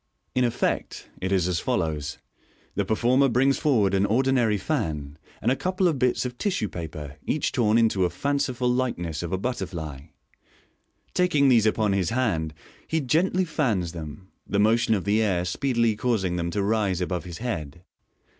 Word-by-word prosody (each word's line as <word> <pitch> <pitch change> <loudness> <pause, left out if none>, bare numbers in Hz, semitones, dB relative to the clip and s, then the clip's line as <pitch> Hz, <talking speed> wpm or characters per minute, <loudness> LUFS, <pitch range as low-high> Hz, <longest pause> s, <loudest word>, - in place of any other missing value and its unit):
In 125 - +2
effect 120 -2 -2
it 95 +1 -2
is 95 -3 +2
as 90 -2 0
follows: 75 -3 -2 0.3
— - - -34
The 100 - +1
performer 125 +6 +3
brings 135 +3 +2
forward 110 -10 +2
an 100 +1 +3
ordinary 120 -2 +2
fan, 80 - -3 0.2
and - - +3
a - - +3
couple 185 +4 0
of 155 -6 0
bits 125 0 +1
of 125 -1 -5
tissue 180 - -1
paper, 75 -4 -7
each 150 - 0
torn 115 -3 +2
into 110 -5 +3
a 90 - +2
fanciful 130 - -1
likeness 120 -11 -1
of 85 - -4
a 95 - 0
butterfly. 85 - -4 1.1
Taking 150 -6 +3
these 115 -4 +5
upon 110 -2 +2
his 95 -3 +1
hand, 85 -11 -1 0.3
he 160 - 0
gently 175 +7 +1
fans 115 - 0
them, 85 +3 -9 0.2
the 100 - -1
motion 110 +2 +3
of 95 - -2
the 105 +2 +2
air 90 -5 +1
speedily 115 +3 +1
causing 105 -6 0
them 85 -1 -1
to 100 +3 -1
rise 100 -3 +1
above 90 -1 -2
his 85 -2 -7
head. 85 - -5
105 Hz, 175 wpm, -25 LUFS, 90-125 Hz, 1.1 s, these